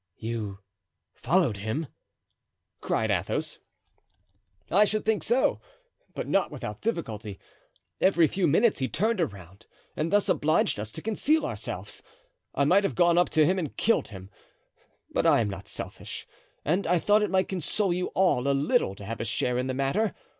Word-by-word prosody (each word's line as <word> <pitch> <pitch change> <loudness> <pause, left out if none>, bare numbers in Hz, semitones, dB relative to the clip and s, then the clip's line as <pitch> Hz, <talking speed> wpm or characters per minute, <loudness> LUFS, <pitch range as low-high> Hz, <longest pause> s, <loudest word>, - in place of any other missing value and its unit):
"You 110 -3 -4 0.6
followed 165 - +1
him?" 110 +11 -3 1.0
cried - - 0
Athos. - - -1 1.1
"I 200 +4 +6
should 215 +1 0
think 220 -1 +1
so, 245 +3 +1 0.5
but - - -4
not - - +2
without - - -7
difficulty. 110 - -4 0.6
Every 175 -3 +5
few 180 +3 0
minutes 205 +8 +3
he 130 - 0
turned 220 0 0
around, 95 - -6 0.3
and 160 +2 -2
thus 205 0 +3
obliged 155 -7 +2
us 105 +1 -5
to 160 - -7
conceal 290 +9 +1
ourselves. - - -5 0.5
I 140 - +2
might 190 +7 +4
have 195 - -1
gone 175 -1 +4
up 175 - +3
to 155 -1 +4
him 185 +4 +2
and 155 -6 -5
killed 230 - +2
him. 95 -1 -11 0.8
But - - +1
I - - +5
am 105 -3 0
not 100 0 -8
selfish, - - -5 0.4
and 175 +7 +1
I 180 +1 +3
thought 205 +5 +3
it 210 - 0
might 190 0 +2
console 190 +1 -1
you 180 +1 -1
all 180 -9 +2
a 140 0 +2
little 135 -8 +1
to 100 - -10
have 115 +2 -5
a - - -1
share 125 +2 0
in 130 - -1
the 130 - -2
matter. 155 +11 0
160 Hz, 170 wpm, -27 LUFS, -, 1.1 s, I